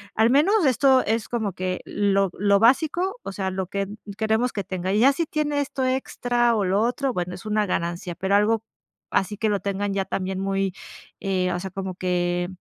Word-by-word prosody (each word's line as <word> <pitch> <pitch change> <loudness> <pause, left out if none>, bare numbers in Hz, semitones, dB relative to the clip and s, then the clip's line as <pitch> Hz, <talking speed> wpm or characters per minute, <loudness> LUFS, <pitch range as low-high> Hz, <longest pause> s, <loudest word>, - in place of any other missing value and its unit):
al 225 +2 +4
menos 330 - +4
esto 265 0 +4
es 225 +1 0
como 220 -6 -2
que 185 0 -3
lo 195 -1 +1
lo 200 0 +3
básico, 330 - +2
o - - -5
sea, 190 -1 -3
lo 190 -1 -3
que 200 0 -2 0.3
queremos 220 +3 +1
que 200 - -2
tenga. 185 0 -3
Y 210 - +2
ya 275 +4 +6
si 335 +4 -1
tiene 295 -2 -1
esto 270 -2 -2
extra 245 -2 +1
o 205 - +1
lo 195 +3 +2
otro, 250 +2 0
bueno, 180 0 -3
es 180 - -12
una 215 0 +1
ganancia", 175 -1 -3
pero 190 +1 +1
algo 220 +2 +2 0.5
así 205 +1 0
que 220 -1 0
lo 200 -1 +1
tengan 200 0 -2
ya 195 -1 -1
también 190 0 -3
muy, 195 -1 -1 0.5
eh, 185 -2 0
o 175 - -2
sea, 190 +1 -5
como 190 -1 -5
que, 175 -1 0
205 Hz, 205 wpm, -24 LUFS, 190-245 Hz, 0.5 s, ya